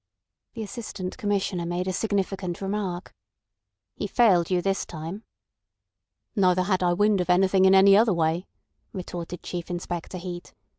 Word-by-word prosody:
The 225 - -4
Assistant 205 -3 -6
Commissioner 195 -4 -1
made 175 +1 -2
a 185 - -1
significant 195 -3 -2
remark. 195 -3 -3 0.8
"He 205 - -4
failed 190 -7 +3
you 180 -1 +2
this 195 +2 0
time." 170 +7 -7 1.1
"Neither 185 -3 +3
had 185 -1 0
I 175 -1 +3
wind 205 +1 +3
of 180 - -4
anything 190 +1 +4
in 190 0 +6
any 195 +1 +7
other 220 +1 +5
way," 170 +1 0 0.5
retorted 180 -2 -6
Chief 175 -1 -5
Inspector 175 0 -4
Heat. 175 0 -8
185 Hz, 145 wpm, -25 LUFS, 175-200 Hz, 1.1 s, any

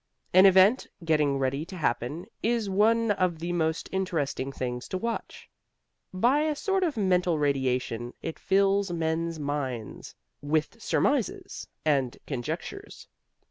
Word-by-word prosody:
An 185 +2 +8
event 190 +6 +5 0.2
getting 150 -3 +2
ready 135 +2 -1
to 190 +2 -9
happen 150 +3 -2 0.2
is 230 -3 0
one 225 +3 +3
of 185 -4 +1
the 170 +2 -3
most 160 -1 -1
interesting 160 -8 -2
things 125 -2 -4
to 185 - -3
watch. 230 +4 -5 0.6
By 240 +10 +3
a 305 0 0
sort 385 +5 0
of 315 -8 -1
mental 180 -4 +2
radiation 130 -4 -1
it 165 - -6
fills 195 0 +2
men's 165 0 -1
minds 135 -6 -4 0.3
with 150 +1 -1
surmises - - -1 0.2
and 135 -5 +1
conjectures. 125 -4 -6
165 Hz, 130 wpm, -27 LUFS, 140-195 Hz, 0.6 s, An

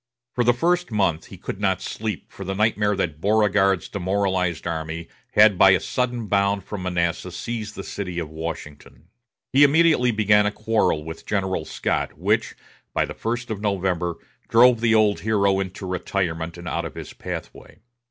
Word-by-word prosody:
For 120 - +1
the 120 - +5
first 175 +8 +1
month 95 -7 0
he - - -11
could - - -6
not - - +1
sleep 110 -1 -5
for 100 - -8
the 95 +1 -3
nightmare 105 0 +2
that 80 -4 -3
Beauregard's 100 -3 +2
demoralized 95 -3 -1
army 80 0 -4 0.3
had 105 -3 +6
by 95 - +8
a 95 - +3
sudden 125 -2 -2
bound 100 -1 +1
from 100 0 -6
Manassas 90 0 -2
seized 110 -3 -5
the 95 - -6
city 90 -4 -5
of 85 -3 -2
Washington. 80 0 -8 0.4
He 140 +2 +6
immediately 150 -3 +4
began 105 -2 +3
a - - 0
quarrel 110 -8 0
with 80 +1 -9
General 95 -5 -1
Scott, - - -2
which, - - 0 0.4
by - - +2
the - - -7
first 120 +1 -3
of 105 -2 -4
November, 90 -4 -1 0.3
drove 120 0 +6
the 115 -1 +3
old 105 -2 +3
hero 100 -2 +2
into 95 0 -5
retirement 90 -3 -2
and 85 0 -9
out 85 0 -2
of 85 - -7
his - - -8
pathway. - - -8
100 Hz, 170 wpm, -23 LUFS, 90-110 Hz, 0.4 s, by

